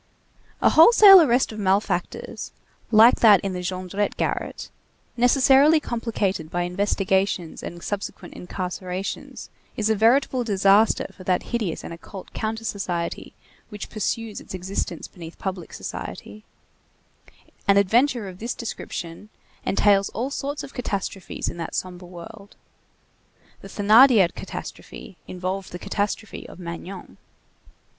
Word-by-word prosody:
A - - +5
wholesale 390 +2 +9
arrest 255 -5 +2
of 215 - -8
malefactors, 200 +1 -1 0.4
like 225 +2 +6
that 210 -4 +7
in 195 -1 -3
the 180 - -4
Jondrette 185 +3 -3
garret, - - -3 0.4
necessarily 270 +5 +5
complicated 210 - -2
by 175 +1 -1
investigations 190 -1 -1
and 170 0 -8
subsequent 205 -1 -5
incarcerations, 180 +1 -6 0.3
is 220 0 +1
a - - +3
veritable 250 +4 +3
disaster 200 0 +3
for 185 - -12
that 180 -1 +1
hideous 215 -9 -2
and - - -7
occult 185 +3 -11
counter 220 0 -3
society 180 -6 -4 0.3
which 210 -2 -8
pursues 220 0 -3
its - - -9
existence 185 -2 -4
beneath 165 -2 -11
public 185 -3 -5
society; 105 +1 -8 1.2
an 200 0 +5
adventure 230 +3 +2
of 185 -1 -10
this 235 +2 -4
description 195 -4 -7 0.4
entails 200 0 +3
all 255 +5 -2
sorts 285 +1 -4
of - - -10
catastrophes 200 -5 -4
in - - -4
that 165 -1 -5
sombre 180 -1 -5
world. 200 +4 -12 1.1
The - - -10
Thénardier 215 -2 +5
catastrophe 185 - -9
involved 185 +1 -4
the 180 - -6
catastrophe 205 +3 -4
of - - -12
Magnon. 180 +2 -8
200 Hz, 125 wpm, -23 LUFS, 185-225 Hz, 1.2 s, wholesale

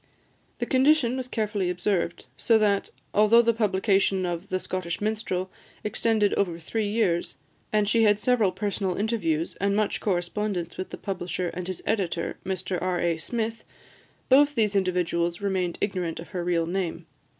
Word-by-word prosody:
The - - -2
condition 265 -2 +3
was 260 -1 -4
carefully 210 -6 -1
observed; 180 -1 -1
so 230 - +3
that, 205 -2 +2 0.2
although 215 +3 +6
the 230 0 +3
publication 195 -3 +2
of 175 +2 -4
"The 185 - 0
Scottish 185 -2 -3
Minstrel" 205 -3 -2 0.3
extended 210 -1 +1
over 175 -4 0
three 210 +6 -2
years, 205 -5 0 0.3
and 210 -1 +2
she 225 +2 +3
had 210 -2 +4
several 225 -5 +2
personal 195 -3 -2
interviews 200 -7 -1
and 200 +1 +1
much 215 -1 0
correspondence 180 -1 -1
with 185 - -5
the - - -7
publisher 180 -2 -3
and 180 +1 -6
his 185 -2 -5
editor, 180 -6 -1
Mr 185 -1 -2
R. 180 -1 0
A. 170 -2 0
Smith, 225 +5 -3 0.6
both 285 +2 +5
these 210 -4 +1
individuals 175 -2 0
remained 190 -3 -1
ignorant 180 -5 -2
of 165 - -9
her 180 -3 -3
real 170 -1 +1
name. 170 -1 -3
195 Hz, 160 wpm, -26 LUFS, 175-215 Hz, 0.6 s, although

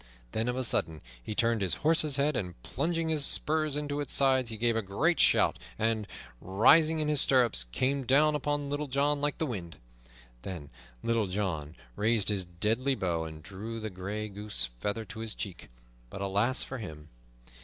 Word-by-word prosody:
Then 110 +2 -1
of 125 - 0
a 130 - -1
sudden 80 -9 +2 0.2
he 105 - -6
turned 115 -1 +2
his 95 -3 +2
horse's 155 -3 +4
head, 145 +1 +1
and 90 - -4
plunging 165 -1 -1
his 155 -2 +1
spurs 155 0 +1
into 145 -1 -2
its 145 - -1
sides 130 -3 +3
he 110 - -5
gave 115 +1 +2
a 115 - +1
great 140 - +1
shout, - - +4 0.2
and, 110 -1 0 0.3
rising 155 - +4
in 155 - 0
his 150 -2 +2
stirrups, 120 - +3
came 130 - -1
down 150 +3 +5
upon 145 0 -1
Little 145 +1 -2
John 140 +2 +1
like 145 0 0
the 160 - 0
wind. 95 - -6 0.6
Then 80 -5 -7 0.3
Little 115 -3 +1
John 90 -6 -3 0.2
raised 110 -2 +2
his 100 -3 -1
deadly 110 +10 0
bow 85 -6 -1
and 80 -1 -9
drew 105 +6 -6
the 110 -1 -5
gray 100 +4 -4
goose 100 - -3
feather 105 - -2
to 110 - -9
his 110 -1 -4
cheek. 95 -4 -7 0.4
But 95 +9 -6
alas 105 +7 +1
for 130 - -6
him! 75 -8 -9
115 Hz, 185 wpm, -30 LUFS, 95-140 Hz, 0.6 s, down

